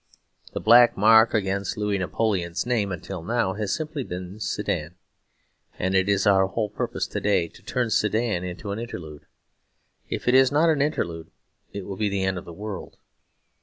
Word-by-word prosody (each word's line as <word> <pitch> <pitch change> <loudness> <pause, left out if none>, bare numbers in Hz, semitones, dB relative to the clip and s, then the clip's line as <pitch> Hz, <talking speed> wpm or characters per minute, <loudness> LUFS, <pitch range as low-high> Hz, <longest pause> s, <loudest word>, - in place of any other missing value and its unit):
The - - -2
black 120 +2 +6
mark 110 +3 +6
against 100 -1 -1
Louis 105 -1 0
Napoleon's 90 -3 -1
name 115 -5 0
until 90 0 -6
now, 110 +1 0
has 105 0 -3
simply 155 -3 -3
been 90 0 -7
Sedan; - - -3 0.8
and 95 +1 -1
it 95 +1 +2
is 100 -1 +2
our 95 -1 +4
whole 105 +1 -2
purpose - - -2
to - - -5
day 100 -5 +2
to - - -18
turn 125 -3 -2
Sedan 105 -3 +1
into 90 +3 -6
an 100 - -3
interlude. 80 -10 -8 0.8
If - - -4
it 125 - +4
is 130 0 +6
not 155 +3 +3
an 150 -3 +1
interlude, 85 - -2 0.4
it 100 -2 -6
will 100 -1 -6
be 105 0 0
the 100 -1 -1
end 95 -1 0
of - - -13
the - - -9
world. 100 +1 -7
100 Hz, 180 wpm, -25 LUFS, 95-115 Hz, 0.8 s, black